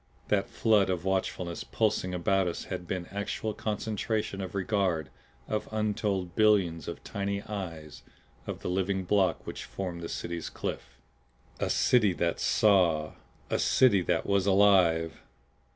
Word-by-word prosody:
That 100 Hz, -2 st, +1 dB
flood 105 Hz, -4 st, +3 dB
of 90 Hz, -1 st, -2 dB
watchfulness 95 Hz, -2 st, -2 dB
pulsing 105 Hz, -4 st, 0 dB
about 95 Hz, +1 st, +1 dB
us 85 Hz, -, -3 dB
had 90 Hz, -, -6 dB
been 90 Hz, -1 st, -3 dB
actual 100 Hz, +2 st, -3 dB
concentration 105 Hz, -1 st, -2 dB
of 95 Hz, 0 st, -6 dB
regard 95 Hz, -, 0 dB, 0.4 s
of 110 Hz, -, -2 dB
untold 105 Hz, -4 st, -1 dB
billions 95 Hz, -7 st, +3 dB
of -, -, -6 dB
tiny 100 Hz, 0 st, -3 dB
eyes 85 Hz, -8 st, -6 dB, 0.5 s
of -, -, -5 dB
the -, -, -4 dB
living 95 Hz, +1 st, 0 dB
block 95 Hz, 0 st, +1 dB
which -, -, -6 dB
formed 90 Hz, -3 st, -5 dB
the 85 Hz, -, -5 dB
City's 85 Hz, -1 st, -4 dB
cliff. -, -, -6 dB, 0.6 s
A -, -, -1 dB
City 105 Hz, -6 st, +3 dB
that 85 Hz, -1 st, -1 dB
Saw! 90 Hz, -7 st, +3 dB, 0.4 s
A -, -, +1 dB
City 115 Hz, -7 st, +4 dB
that 85 Hz, -1 st, 0 dB
was 100 Hz, -1 st, +1 dB
Alive! 95 Hz, -5 st, +4 dB
95 Hz, 140 wpm, -29 LUFS, 85-105 Hz, 0.6 s, City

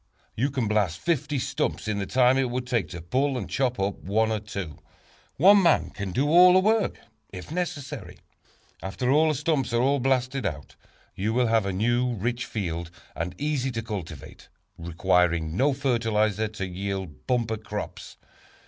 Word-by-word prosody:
You 130 Hz, +6 st, +1 dB
can 130 Hz, -5 st, -1 dB
blast 105 Hz, -6 st, +1 dB
fifty 150 Hz, -3 st, -1 dB
stumps 125 Hz, -, -2 dB
in 105 Hz, -1 st, -1 dB
the 100 Hz, -, -3 dB
time 130 Hz, 0 st, +4 dB
it 130 Hz, -2 st, +1 dB
would 125 Hz, +1 st, -3 dB
take 120 Hz, -10 st, -1 dB
to 85 Hz, -2 st, -8 dB
pull 130 Hz, +9 st, 0 dB
and 110 Hz, -, -4 dB
chop 125 Hz, -4 st, -1 dB
up 95 Hz, +1 st, -1 dB
one 110 Hz, +3 st, 0 dB
or 110 Hz, -, 0 dB
two. 100 Hz, -7 st, -7 dB, 0.6 s
One 195 Hz, +6 st, +7 dB
man 170 Hz, -4 st, +3 dB
can 100 Hz, -2 st, -5 dB
do 135 Hz, +10 st, +1 dB
all 180 Hz, +3 st, +7 dB
the 185 Hz, -, +6 dB
work, 215 Hz, +2 st, +1 dB, 0.3 s
if 90 Hz, +6 st, -9 dB
necessary. 145 Hz, -, -4 dB, 0.6 s
After 95 Hz, +6 st, -4 dB
the 155 Hz, +4 st, +4 dB
stumps 135 Hz, -4 st, 0 dB
are 120 Hz, -, +3 dB
all 140 Hz, +2 st, +2 dB
blasted 130 Hz, 0 st, 0 dB
out, 75 Hz, -6 st, -5 dB, 0.4 s
you 105 Hz, +4 st, -2 dB
will 125 Hz, 0 st, +3 dB
have 110 Hz, -3 st, +2 dB
a -, -, 0 dB
new, 120 Hz, +5 st, +1 dB
rich 120 Hz, +4 st, -2 dB
field, 85 Hz, -7 st, -4 dB, 0.3 s
and 90 Hz, +2 st, -4 dB
easy 145 Hz, -3 st, -1 dB
to 115 Hz, 0 st, -3 dB
cultivate, 90 Hz, -, -8 dB, 0.3 s
requiring 85 Hz, -1 st, +1 dB
no 135 Hz, +8 st, +3 dB
fertilizer 110 Hz, -5 st, 0 dB
to 105 Hz, -2 st, -5 dB
yield 95 Hz, -6 st, -5 dB
bumper 115 Hz, -3 st, 0 dB
crops. 105 Hz, -1 st, -7 dB
115 Hz, 170 wpm, -26 LUFS, 95-135 Hz, 0.6 s, One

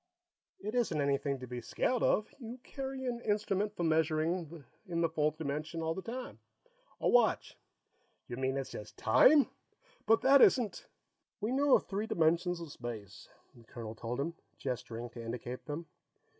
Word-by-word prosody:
"It 210 Hz, +2 st, -4 dB
isn't 230 Hz, -11 st, +1 dB
anything 140 Hz, 0 st, +1 dB
to 130 Hz, -, -7 dB
be 125 Hz, 0 st, -5 dB
scared 250 Hz, -, 0 dB
of. 215 Hz, -, +2 dB
You 240 Hz, 0 st, -7 dB
carry 265 Hz, -1 st, -5 dB
an 240 Hz, -2 st, -2 dB
instrument 210 Hz, -1 st, 0 dB
for 175 Hz, -, -2 dB
measuring 160 Hz, 0 st, 0 dB, 0.2 s
in 170 Hz, -2 st, -1 dB
the 165 Hz, -, +3 dB
fourth 155 Hz, -1 st, 0 dB
dimension 155 Hz, +2 st, -3 dB
all 160 Hz, 0 st, 0 dB
the 190 Hz, -, -5 dB
time. 245 Hz, +5 st, -6 dB, 0.6 s
A -, -, 0 dB
watch." 240 Hz, -3 st, +3 dB, 0.7 s
"You 120 Hz, -, -5 dB
mean 130 Hz, +1 st, 0 dB
it's 135 Hz, -, -4 dB
just 105 Hz, -, -8 dB
time? 275 Hz, -, +6 dB, 0.6 s
But 225 Hz, 0 st, +5 dB
that 275 Hz, +1 st, +7 dB
isn't 240 Hz, -5 st, +4 dB, 0.3 s
" -, -, -55 dB
"We 215 Hz, +3 st, -1 dB
know 280 Hz, +1 st, +5 dB
of -, -, +1 dB
three 205 Hz, +2 st, -2 dB
dimensions 170 Hz, +1 st, +2 dB
of 165 Hz, -3 st, -7 dB
space," 110 Hz, -7 st, -8 dB, 0.2 s
the 120 Hz, -, -17 dB
colonel 115 Hz, -1 st, -7 dB
told 115 Hz, +3 st, -4 dB
him, 165 Hz, +5 st, -1 dB, 0.2 s
gesturing 120 Hz, -2 st, -4 dB
to 115 Hz, -, -8 dB
indicate 120 Hz, +2 st, -5 dB
them. 155 Hz, +3 st, -4 dB
160 Hz, 170 wpm, -33 LUFS, 130-215 Hz, 0.7 s, that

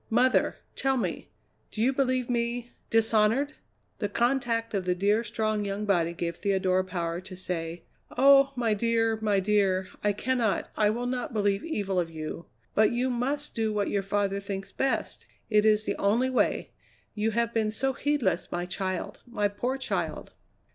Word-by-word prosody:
"Mother, 250 Hz, +3 st, +3 dB, 0.2 s
tell 270 Hz, -1 st, +1 dB
me, 240 Hz, -, -3 dB, 0.4 s
do -, -, -9 dB
you 250 Hz, +5 st, +3 dB
believe 255 Hz, -2 st, +1 dB
me 240 Hz, 0 st, -1 dB, 0.2 s
dishonoured?" 225 Hz, +5 st, +3 dB, 0.5 s
The 205 Hz, -, -1 dB
contact 235 Hz, 0 st, 0 dB
of 195 Hz, -3 st, -1 dB
the 180 Hz, 0 st, +1 dB
dear, 205 Hz, +5 st, +2 dB
strong 215 Hz, -1 st, -1 dB
young 200 Hz, +1 st, -3 dB
body 175 Hz, -5 st, +2 dB
gave 170 Hz, 0 st, -4 dB
Theodora 185 Hz, -2 st, +1 dB
power 175 Hz, -2 st, -3 dB
to 185 Hz, 0 st, -10 dB
say: 170 Hz, -2 st, -4 dB, 0.3 s
"Oh! 275 Hz, +1 st, +7 dB
my 235 Hz, -3 st, +1 dB
dear, 225 Hz, +1 st, +1 dB
my 205 Hz, -2 st, +2 dB
dear, 190 Hz, -2 st, +1 dB
I 205 Hz, -, +3 dB
cannot, 235 Hz, -1 st, 0 dB
I 210 Hz, -1 st, +3 dB
will 235 Hz, +3 st, -2 dB
not 245 Hz, 0 st, -3 dB
believe 200 Hz, -1 st, +1 dB
evil 200 Hz, -, -1 dB
of 170 Hz, -2 st, -1 dB
you. 160 Hz, +1 st, -6 dB, 0.3 s
But 215 Hz, 0 st, +4 dB
you 250 Hz, +2 st, 0 dB
must 275 Hz, +5 st, -2 dB
do 220 Hz, -1 st, 0 dB
what 205 Hz, -1 st, -1 dB
your 200 Hz, -, +1 dB
father 200 Hz, 0 st, 0 dB
thinks 195 Hz, -1 st, -5 dB
best; 270 Hz, -, -2 dB, 0.2 s
it 210 Hz, 0 st, +4 dB
is 215 Hz, 0 st, +3 dB
the -, -, -2 dB
only 235 Hz, +6 st, +2 dB
way. 255 Hz, -, +1 dB, 0.4 s
You 215 Hz, +1 st, 0 dB
have 235 Hz, 0 st, +1 dB
been 220 Hz, -2 st, +1 dB
so 265 Hz, +5 st, -1 dB
heedless, 265 Hz, -, 0 dB
my 175 Hz, 0 st, -2 dB
child, 185 Hz, +1 st, -4 dB
my 210 Hz, -4 st, 0 dB
poor 245 Hz, +6 st, -2 dB
child." 265 Hz, -, -3 dB
215 Hz, 170 wpm, -28 LUFS, 195-245 Hz, 0.5 s, Oh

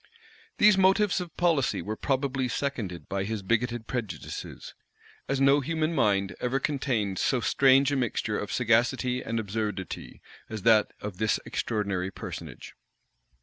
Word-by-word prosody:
[*] 450 Hz, 0 st, -28 dB
These 205 Hz, -2 st, +6 dB
motives 190 Hz, 0 st, +3 dB
of 170 Hz, -3 st, -9 dB
policy 165 Hz, -7 st, +2 dB
were 105 Hz, +1 st, -4 dB
probably 135 Hz, 0 st, -1 dB
seconded 105 Hz, -, -3 dB
by 100 Hz, 0 st, -2 dB
his 105 Hz, 0 st, -4 dB
bigoted 115 Hz, +2 st, 0 dB
prejudices; 110 Hz, -12 st, -6 dB, 0.6 s
as 135 Hz, -1 st, 0 dB
no 140 Hz, +1 st, +5 dB
human 160 Hz, +3 st, -1 dB
mind 100 Hz, -, +1 dB
ever 125 Hz, +2 st, 0 dB
contained 125 Hz, -9 st, -1 dB
so 130 Hz, -, +2 dB
strange 135 Hz, +2 st, +4 dB
a -, -, +1 dB
mixture 115 Hz, -4 st, -1 dB
of 105 Hz, -, -5 dB
sagacity 125 Hz, +2 st, +1 dB
and 115 Hz, -2 st, -2 dB
absurdity 105 Hz, -2 st, -4 dB, 0.3 s
as 110 Hz, -3 st, -6 dB
that 110 Hz, -2 st, +5 dB
of 100 Hz, -3 st, -6 dB
this 110 Hz, -1 st, +1 dB
extraordinary 100 Hz, -5 st, -2 dB
personage. -, -, -8 dB
120 Hz, 145 wpm, -27 LUFS, 105-140 Hz, 0.6 s, These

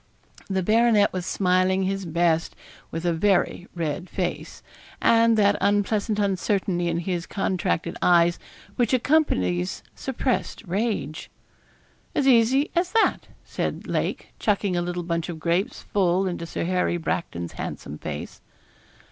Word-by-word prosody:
The 190 Hz, -1 st, 0 dB
baronet 220 Hz, 0 st, +4 dB
was 185 Hz, -1 st, -3 dB
smiling 185 Hz, 0 st, +2 dB
his 195 Hz, -1 st, -2 dB
best, 165 Hz, 0 st, +1 dB, 0.3 s
with 165 Hz, +1 st, -5 dB
a 170 Hz, -, +2 dB
very 180 Hz, 0 st, +1 dB
red 170 Hz, +1 st, -3 dB
face, -, -, -4 dB, 0.4 s
and 230 Hz, 0 st, +4 dB
that 205 Hz, -1 st, +4 dB
unpleasant 205 Hz, +2 st, +1 dB
uncertainty 190 Hz, -3 st, 0 dB
in 170 Hz, -1 st, 0 dB
his 175 Hz, -1 st, -3 dB
contracted 180 Hz, -4 st, -1 dB
eyes 175 Hz, 0 st, +4 dB, 0.4 s
which 245 Hz, 0 st, +3 dB
accompanies 95 Hz, -, +1 dB
suppressed 260 Hz, -2 st, -2 dB
rage. 185 Hz, -6 st, -2 dB, 0.9 s
'As 275 Hz, -, +2 dB
easy 260 Hz, +3 st, +4 dB
as 350 Hz, +3 st, 0 dB
that,' 450 Hz, -, +2 dB, 0.2 s
said -, -, -3 dB
Lake, -, -, -3 dB
chucking 200 Hz, -3 st, +1 dB
a 175 Hz, -, +1 dB
little 175 Hz, 0 st, -3 dB
bunch 170 Hz, 0 st, -2 dB
of 165 Hz, -2 st, -5 dB
grapes 175 Hz, -, -1 dB
full 190 Hz, -1 st, +1 dB
into 175 Hz, -2 st, -3 dB
Sir -, -, -3 dB
Harry 180 Hz, 0 st, 0 dB
Bracton's 85 Hz, -, -3 dB
handsome 75 Hz, -, -6 dB
face. 75 Hz, -1 st, -6 dB
185 Hz, 130 wpm, -24 LUFS, 170-210 Hz, 0.9 s, baronet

